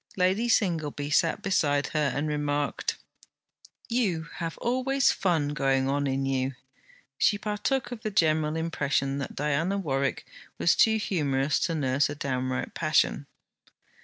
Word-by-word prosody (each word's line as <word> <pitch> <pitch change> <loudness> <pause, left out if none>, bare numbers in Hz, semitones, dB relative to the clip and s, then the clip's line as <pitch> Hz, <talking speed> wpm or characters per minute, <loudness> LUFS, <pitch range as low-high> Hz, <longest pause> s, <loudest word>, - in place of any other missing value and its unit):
Lady 190 +6 +2
Singleby 155 -9 0
sat 165 +7 +2
beside 145 -8 +1
her, 150 -3 +1
and 145 +2 -1
remarked: 145 -1 -1 0.9
'You 210 -9 0
have 165 -1 -4
always 260 +2 +2
fun 165 -6 0
going 135 -2 +1
on 140 +1 0
in 135 0 -1
you!' 135 0 -1 0.6
She 205 - +3
partook 210 +6 -2
of 240 -3 -6
the 220 - -2
general 155 -5 +2
impression 140 -4 -1
that 135 - -5
Diana 150 +7 0
Warwick 140 -7 -1 0.3
was 170 - +3
too 220 0 +4
humorous 150 -9 0
to 165 - 0
nurse 140 -1 +1
a 145 - -4
downright 130 -2 -2
passion. - - +1
150 Hz, 135 wpm, -27 LUFS, 140-195 Hz, 0.9 s, too